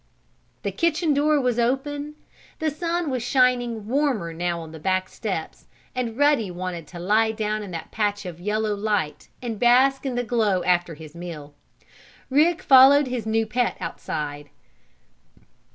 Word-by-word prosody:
The - - -1
kitchen 335 -1 +1
door 295 +1 +3
was 250 -3 0
open. 285 +5 -1 0.4
The 315 -1 -1
sun 335 0 -2
was 255 -2 -1
shining 245 -3 +1
warmer 240 - 0
now 170 +1 -2
on 160 -1 -9
the 160 - -10
back 185 +3 0
steps, 185 -8 -5 0.3
and 245 -3 -3
Ruddy 285 -8 +3
wanted 175 -2 -5
to 175 - -10
lie 215 +5 +2
down 215 -1 -2
in 205 - -7
that 165 -2 -7
patch 205 -2 -1
of 175 -2 -7
yellow 210 +3 -1
light, 205 -7 -2
and 225 -4 -4
bask 260 +3 +4
in 265 -3 -3
the 245 - 0
glow 215 -6 +1
after 175 -2 +1
his 155 -1 -12
meal. 165 -4 -8 0.8
Rick 325 +6 +3
followed 275 +2 +7
his 240 -3 -3
new 225 0 +1
pet 240 +2 -1
outside. 145 -1 -5
220 Hz, 155 wpm, -24 LUFS, 180-270 Hz, 0.8 s, followed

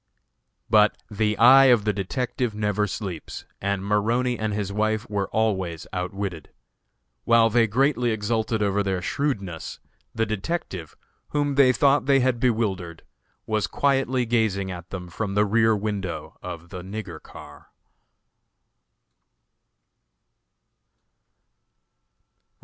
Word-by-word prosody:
But 105 -1 +4
the 105 0 0
eye 130 +3 +8
of 120 -5 +4
the 105 - +2
detective 120 +3 -2
never 105 0 0
sleeps, 95 -5 -6 0.2
and 100 0 -1
Maroney 115 +5 +1
and 110 -1 -1
his 100 -1 -3
wife 110 +1 0
were 100 -2 -1
always 95 -7 -1
outwitted. 90 -2 -4 0.7
While 115 -1 +4
they 115 0 +4
greatly 125 +2 +1
exulted 110 0 -1
over 100 0 +1
their 95 -3 -2
shrewdness, 100 - -3 0.4
the 115 0 +1
detective, 105 - -4 0.3
whom 145 -1 0
they 135 -2 +5
thought 140 +1 +2
they 135 -1 +5
had 125 -2 +1
bewildered, 100 -9 -1 0.4
was 110 -5 0
quietly 135 -1 +1
gazing 110 -5 0
at 85 -1 -8
them 90 -2 -6
from 100 +3 -4
the 105 +1 +4
rear 110 +1 +3
window 100 -3 -4
of 85 -1 -8
the 90 - -7
"nigger 95 -3 -7
car." 75 -1 -13
105 Hz, 115 wpm, -24 LUFS, 95-120 Hz, 0.7 s, eye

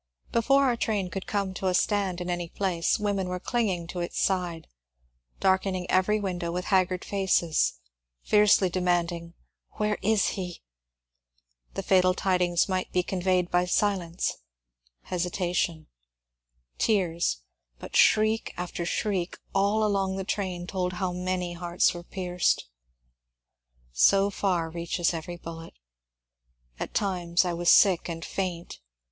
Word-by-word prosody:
Before 275 +4 +3
our 255 -3 +2
train 205 -5 -1
could 195 - -5
come 200 -2 -1
to 190 +1 -3
a 180 - +2
stand 195 -3 +1
in 175 - -4
any 175 -1 -3
place, 180 -4 0
women 200 -3 -1
were 180 0 -3
clinging 195 -7 -1
to 180 - -5
its 175 - -3
side, 180 -4 -1 0.7
darken 190 0 +2
ing 180 -1 -4
every 190 +3 +3
window 180 -4 -3
with 180 +1 -3
haggard 185 -1 +2
faces, 190 -5 +1 0.5
fiercely 210 -2 +4
demanding, 175 -1 -1 0.4
Where 210 0 -1
is 215 0 +2
he? 180 -3 -6 0.5
" - - -44
The - - -3
fatal 185 -1 +4
tidings 180 -3 +1
might 185 -1 -2
be 180 - +1
conveyed 180 -1 0
by 175 0 +3
silence, 180 -2 0 0.7
hesitation, 175 -2 -1 0.9
tears, 170 - +1 0.4
but - - -9
shriek 215 +1 +3
after 175 -1 -4
shriek 190 -2 -1 0.2
all 200 +2 +2
along 195 -2 0
the 195 - -3
train 185 -3 -3
told 180 0 -2
how 185 0 -2
many 180 -1 -2
hearts 175 +1 +1
were 175 - -7
pierced. 180 0 -1 1.3
So 195 - +4
far 180 -5 0
reaches 170 +1 -1
every 170 +1 -5
bullet! 165 0 -9 1.0
At - - -5
times 180 -3 +1
I 175 - -1
was 175 0 +1
sick 185 -3 +5
and 165 0 -5
faint. 180 -3 -4
180 Hz, 135 wpm, -27 LUFS, 175-195 Hz, 1.3 s, sick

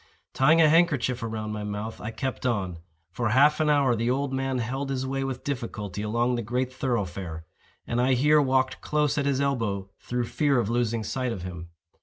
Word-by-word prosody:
Tying 155 +5 +4
a 160 - +7
handkerchief 150 -6 +3
about 110 -1 -4
my 105 -1 -4
mouth, 105 +2 -5
I 105 - -4
kept 130 +3 -4
on. 95 -8 -1 0.3
For 115 +4 -1
half 145 +7 +5
an 155 -1 +2
hour 140 -4 +3
the 115 +2 0
old 135 +1 0
man 135 0 -1
held 135 +4 -3
his 130 -1 -2
way 135 +1 -2
with 130 -2 -4
difficulty 110 -7 -4
along 120 +4 0
the 120 - -1
great 125 +3 -2
thoroughfare; 95 -10 -3 0.4
and 120 +1 0
I 130 +1 +3
here 150 +4 +4
walked 130 -1 +1
close 150 -1 +1
at 140 - 0
his 140 -1 +1
elbow 110 -9 -1
through 125 0 -2
fear 140 +2 +1
of 115 -1 -1
losing 115 -2 0
sight 130 +2 -2
of 95 -6 -5
him. 85 -2 -7
125 Hz, 200 wpm, -26 LUFS, 110-135 Hz, 0.4 s, a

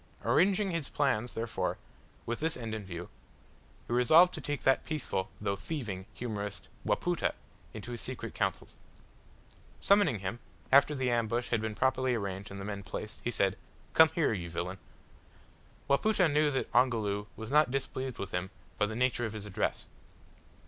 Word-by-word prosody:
Arranging 195 +2 +3
his 165 -4 -2
plans 125 -5 0
therefore, 115 0 -2 0.5
with 120 0 -2
this 160 +1 +1
end 115 -3 -5
in 110 -1 -4
view, 90 -2 -6 0.8
he - - -4
resolved 160 +9 +6
to - - -5
take 145 -1 -3
that 135 - +4
peaceful, 140 -11 -2
though 100 -1 -1
thieving, 100 - -5
humorist 105 -6 -4
Wapoota, 175 -2 0 0.4
into 110 +2 -7
his 120 - -4
secret - - -4
councils. - - -2 1.0
Summoning 200 - +4
him, 100 +4 -4 0.3
after 140 +2 +6
the 130 -2 0
ambush 120 +1 0
had 115 -2 +1
been 110 -1 -3
properly 130 0 +2
arranged 100 -3 -4
and 100 - -7
the 95 - -5
men 100 -1 -4
placed, 100 +4 -6
he - - 0
said, 100 -5 +1 0.3
"Come 160 0 +8
here, 160 -8 +2
you 85 -4 -4
villain." 90 +3 -4 1.1
Wapoota 185 +6 +3
knew 150 0 +3
that 135 -2 -2
Ongoloo 110 -5 +2
was 110 +1 -7
not 150 -2 +5
displeased 130 -1 -3
with 100 -1 -5
him 90 +1 -2 0.3
by 105 - +3
the 110 - -5
nature 125 0 +1
of 110 - -4
his 105 -2 -6
address. 100 -2 -2
120 Hz, 165 wpm, -31 LUFS, 100-140 Hz, 1.1 s, Come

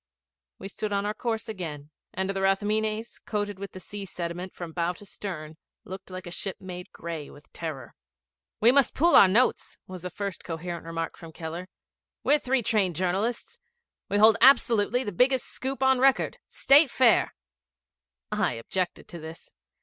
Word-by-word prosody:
We 195 - -7
stood 210 +1 -5
on 200 0 0
our 210 - -1
course 225 0 -3
again; 155 -8 -6 0.2
and 190 +1 -2
the 195 0 -2
Rathmines, 215 +3 0
coated 205 -2 -3
with 200 0 -7
the 185 - -8
sea 205 +2 -8
sediment 175 0 -5
from 170 -2 -7
bow 170 +1 -1
to 205 - -14
stern, 160 -6 -7 0.3
looked 190 +2 -9
like 185 -1 -7
a 175 - -7
ship 190 +2 -5
made 180 -2 -8
gray 165 -3 -6
with 145 - -17
terror. 150 -7 -6 0.7
'We 230 +3 +7
must 275 -2 +3
pool 340 +4 +4
our 195 - +9
notes,' 230 +7 +1
was 185 -1 -9
the 180 - -5
first 200 +1 -5
coherent 170 0 -5
remark 165 0 -4
from 165 -1 -11
Keller. 165 +3 -6 0.6
'We're 295 +1 +4
three 255 -2 0
trained 205 -6 +1
journalists 190 +7 -2 0.5
we 200 - +1
hold 220 +1 +7
absolutely 245 -2 +5
the 205 - -4
biggest 255 +7 +2
scoop 265 0 -4
on 265 -1 +4
record. 270 +1 +3
Start 280 +1 +5
fair.' 240 -2 +4 1.0
I - - +1
objected 175 +10 -3
to 170 - -8
this. 160 +1 -10
195 Hz, 170 wpm, -27 LUFS, 170-220 Hz, 1.0 s, our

